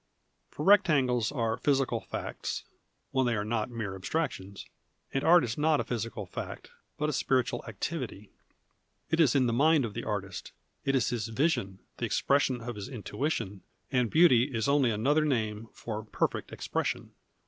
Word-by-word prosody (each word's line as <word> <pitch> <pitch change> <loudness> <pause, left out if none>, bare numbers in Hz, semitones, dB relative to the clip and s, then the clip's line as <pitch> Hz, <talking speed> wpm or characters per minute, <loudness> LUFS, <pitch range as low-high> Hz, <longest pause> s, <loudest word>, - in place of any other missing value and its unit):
For 150 - -5
rectangles 145 - +4
are 115 -5 -1
physical 135 -2 +1
facts 95 - -5 0.5
(when 130 -2 +2
they 120 - +1
arc 105 -1 -1
not 110 0 -1
mere 110 -5 -4
abstrac 95 - -1
tions), 100 +1 -9 0.5
and 135 - 0
art 175 +1 +6
is 120 +3 -3
not 155 0 +3
a - - +1
physical 115 -1 -4
fact, - - -7 0.3
but 150 - 0
a 150 - -1
spiritual 130 -2 +1
activity. 115 -3 -5 0.8
It 160 - +2
is 145 -6 +5
in 130 -2 +4
the 120 - +1
mind 150 +2 +4
of 110 - -6
the - - -4
artist, 100 -4 -4 0.3
it 135 0 +2
is 120 -4 +2
his 115 -3 -2
vision, 110 - 0 0.2
the - - -1
expression 135 -3 +1
of 120 -1 -5
his 100 +4 -6
intuition, 120 -4 -3 0.3
and 125 -4 +2
beauty 150 -7 +6
is 120 -5 -2
only 140 -3 +4
another 135 +9 +2
name 115 -6 -1
for 110 -2 -5
perfect 105 - -2
expression. - - -3
125 Hz, 170 wpm, -29 LUFS, 110-145 Hz, 0.8 s, art